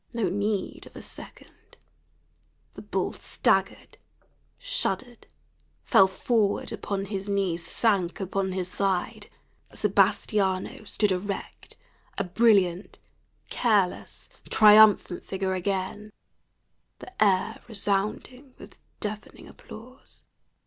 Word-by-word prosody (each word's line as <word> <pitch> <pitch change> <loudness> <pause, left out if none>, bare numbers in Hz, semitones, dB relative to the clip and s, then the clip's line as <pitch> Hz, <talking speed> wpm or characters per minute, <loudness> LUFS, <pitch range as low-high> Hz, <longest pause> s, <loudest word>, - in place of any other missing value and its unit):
No 225 -6 0
need 205 +1 -3
of - - -18
a - - -8
second; - - -13 1.0
the - - -10
bull - - -2
staggered, - - -1 0.6
shuddered, 255 - -3 0.6
fell 190 - +5
forward 205 +2 0
upon 195 -1 -4
his 200 0 -5
knees, 190 -4 -1
sank 195 -4 0
upon 190 0 -2
his 185 -1 -3
side. 190 -1 -2 0.4
Sebastiano 195 -1 0
stood 210 0 0
erect, 195 +2 -5 0.4
a 200 - 0
brilliant, 190 -2 +2 0.5
careless, 210 -6 0 0.2
triumphant 210 -4 +6
figure 190 0 -3
again, 190 +2 -3 0.9
the 375 -11 -2
air 200 +2 +1
resounding 220 +5 -3
with - - -14 0.2
deafening 210 -1 -6
applause. 250 +5 -14
200 Hz, 95 wpm, -26 LUFS, 190-215 Hz, 1.0 s, triumphant